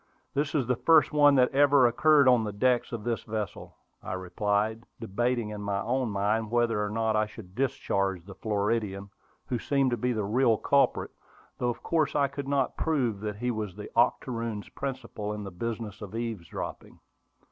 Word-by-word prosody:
This 140 Hz, +2 st, -1 dB
is 135 Hz, -5 st, +2 dB
the 125 Hz, +1 st, +1 dB
first 160 Hz, +4 st, +4 dB
one 145 Hz, -1 st, +6 dB
that 125 Hz, -1 st, +4 dB
ever 140 Hz, -1 st, +5 dB
occurred 140 Hz, +4 st, +5 dB
on 125 Hz, -3 st, +5 dB
the 105 Hz, -, -3 dB
decks 120 Hz, +4 st, +1 dB
of 115 Hz, -3 st, -5 dB
this 115 Hz, 0 st, -1 dB
vessel," 110 Hz, -2 st, -5 dB, 0.3 s
I -, -, -5 dB
replied, 105 Hz, +4 st, -1 dB, 0.2 s
debating 120 Hz, +1 st, -1 dB
in 105 Hz, -1 st, -6 dB
my 100 Hz, -1 st, -1 dB
own 125 Hz, +3 st, -1 dB
mind 105 Hz, +2 st, 0 dB
whether 115 Hz, -2 st, +1 dB
or 105 Hz, -, -2 dB
not 110 Hz, 0 st, 0 dB
I 110 Hz, 0 st, +2 dB
should 105 Hz, -4 st, -12 dB
discharge 100 Hz, -7 st, -1 dB
the 100 Hz, -, -10 dB
Floridian, 100 Hz, -1 st, -2 dB, 0.3 s
who 125 Hz, -5 st, -2 dB
seemed 135 Hz, +1 st, +1 dB
to 120 Hz, -, 0 dB
be 125 Hz, +3 st, 0 dB
the 110 Hz, -3 st, -1 dB
real 115 Hz, +1 st, +3 dB
culprit, 140 Hz, +5 st, +2 dB, 0.5 s
though 120 Hz, -, +1 dB
of 120 Hz, -, -5 dB
course 160 Hz, -3 st, +1 dB
I 140 Hz, -2 st, +3 dB
could 140 Hz, 0 st, -6 dB
not 140 Hz, -2 st, 0 dB
prove 125 Hz, -10 st, 0 dB
that 105 Hz, 0 st, -4 dB
he 125 Hz, +4 st, -2 dB
was 105 Hz, -5 st, -4 dB
the 105 Hz, -, -9 dB
octoroon's 115 Hz, -3 st, 0 dB
principal 120 Hz, -6 st, -5 dB
in 105 Hz, 0 st, -5 dB
the 100 Hz, -, -7 dB
business 110 Hz, +2 st, -5 dB
of 105 Hz, +1 st, -7 dB
eavesdropping. 115 Hz, -7 st, -5 dB
115 Hz, 185 wpm, -28 LUFS, 105-130 Hz, 0.5 s, one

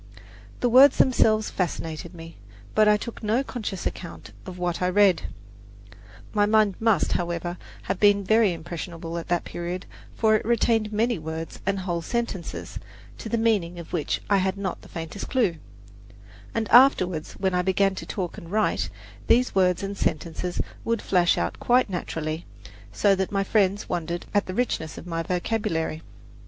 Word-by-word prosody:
The 245 Hz, -, +3 dB
words 260 Hz, +3 st, +7 dB
themselves 220 Hz, -4 st, +3 dB
fascinated 165 Hz, -1 st, -3 dB
me; 165 Hz, 0 st, -11 dB, 0.4 s
but 215 Hz, 0 st, +4 dB
I 210 Hz, 0 st, +5 dB
took 230 Hz, +2 st, -7 dB
no 225 Hz, +4 st, +1 dB
conscious 215 Hz, -8 st, -5 dB
account 170 Hz, -2 st, -6 dB, 0.2 s
of 185 Hz, -1 st, -7 dB
what 175 Hz, -1 st, -2 dB
I 180 Hz, -, +2 dB
read. 195 Hz, -1 st, +4 dB, 1.1 s
My 205 Hz, -1 st, +3 dB
mind 215 Hz, -2 st, +4 dB
must, 220 Hz, -6 st, +2 dB
however, 175 Hz, 0 st, -2 dB, 0.3 s
have 190 Hz, 0 st, -3 dB
been 205 Hz, -1 st, +4 dB
very 220 Hz, 0 st, +4 dB
impressionable 170 Hz, 0 st, -6 dB
at 165 Hz, -, -9 dB
that 175 Hz, -1 st, 0 dB
period, 175 Hz, +2 st, -5 dB, 0.3 s
for 220 Hz, -1 st, +3 dB
it 215 Hz, -, 0 dB
retained 225 Hz, -1 st, +1 dB
many 225 Hz, 0 st, +1 dB
words 160 Hz, +1 st, -6 dB
and 195 Hz, 0 st, +1 dB
whole 175 Hz, -2 st, -2 dB
sentences, 220 Hz, -3 st, -4 dB, 0.4 s
to 225 Hz, -, -6 dB
the 235 Hz, -, 0 dB
meaning 205 Hz, -7 st, +1 dB
of 170 Hz, -, -10 dB
which 160 Hz, -4 st, -1 dB
I 200 Hz, -, +3 dB
had 190 Hz, +1 st, 0 dB
not 195 Hz, -2 st, -4 dB
the -, -, -15 dB
faintest 165 Hz, +4 st, -6 dB
clue; 215 Hz, -11 st, +1 dB, 1.0 s
and 225 Hz, -1 st, 0 dB
afterward, 185 Hz, -, +5 dB
when 190 Hz, -1 st, 0 dB
I 180 Hz, -, +2 dB
began 190 Hz, +1 st, +2 dB
to -, -, -7 dB
talk 180 Hz, -4 st, -4 dB
and 170 Hz, -, -12 dB
write, 215 Hz, +1 st, +1 dB, 0.4 s
these 250 Hz, +2 st, +3 dB
words 185 Hz, 0 st, +2 dB
and 200 Hz, +1 st, -3 dB
sentences 170 Hz, +1 st, -2 dB, 0.2 s
would 230 Hz, -1 st, 0 dB
flash 180 Hz, -2 st, +3 dB
out 85 Hz, +1 st, -2 dB
quite 245 Hz, -3 st, +3 dB
naturally, 160 Hz, -2 st, -4 dB, 0.4 s
so 200 Hz, -1 st, +3 dB
that 190 Hz, -1 st, -1 dB
my 195 Hz, -1 st, +1 dB
friends 200 Hz, 0 st, +1 dB
wondered 170 Hz, 0 st, -3 dB
at 205 Hz, -1 st, +2 dB
the 185 Hz, -, -5 dB
richness 180 Hz, -10 st, -1 dB
of -, -, -9 dB
my 165 Hz, -1 st, -2 dB
vocabulary. 175 Hz, -3 st, -2 dB
190 Hz, 170 wpm, -25 LUFS, 170-215 Hz, 1.1 s, words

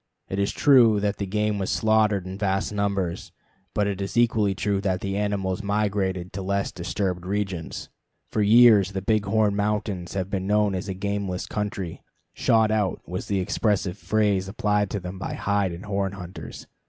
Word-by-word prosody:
It 95 Hz, -, -2 dB
is 100 Hz, -, +1 dB
true 120 Hz, -7 st, +5 dB
that 100 Hz, 0 st, -1 dB
the 100 Hz, -, -3 dB
game 105 Hz, +1 st, 0 dB
was 95 Hz, -, -2 dB
slaughtered 110 Hz, -3 st, +2 dB
in 95 Hz, +1 st, -7 dB
vast 100 Hz, 0 st, 0 dB
numbers, 100 Hz, -4 st, -2 dB, 0.4 s
but 105 Hz, -, +2 dB
it 100 Hz, -1 st, -2 dB
is 100 Hz, +3 st, -4 dB
equally 110 Hz, -4 st, +3 dB
true 100 Hz, 0 st, 0 dB
that 95 Hz, -2 st, 0 dB
the 95 Hz, -1 st, -2 dB
animals 100 Hz, -2 st, -1 dB
migrated 100 Hz, -3 st, -1 dB
to 95 Hz, -, -4 dB
less 100 Hz, +1 st, -1 dB
disturbed 90 Hz, 0 st, -3 dB
regions. 95 Hz, -3 st, -3 dB, 0.4 s
For 110 Hz, -, 0 dB
years 105 Hz, -2 st, +6 dB
the 95 Hz, -1 st, -3 dB
Big 105 Hz, 0 st, +1 dB
Horn 105 Hz, -1 st, +2 dB
Mountains 100 Hz, -3 st, -2 dB
have 95 Hz, 0 st, -2 dB
been 95 Hz, -2 st, -2 dB
known 105 Hz, -1 st, +2 dB
as 95 Hz, +2 st, -4 dB
a 95 Hz, -, -3 dB
gameless 100 Hz, -1 st, -3 dB
country; 100 Hz, -5 st, -4 dB, 0.3 s
"shot 110 Hz, -1 st, +3 dB
out" 105 Hz, -4 st, -1 dB
was 90 Hz, +2 st, -5 dB
the 100 Hz, -2 st, 0 dB
expressive 100 Hz, -1 st, 0 dB
phrase 105 Hz, -3 st, +1 dB
applied 105 Hz, 0 st, 0 dB
to 100 Hz, -, -3 dB
them 90 Hz, +1 st, -7 dB
by -, -, -4 dB
hide 100 Hz, -2 st, 0 dB
and 85 Hz, +4 st, -8 dB
horn 100 Hz, -1 st, -1 dB
hunters. 90 Hz, -2 st, -9 dB
100 Hz, 180 wpm, -25 LUFS, 95-105 Hz, 0.4 s, years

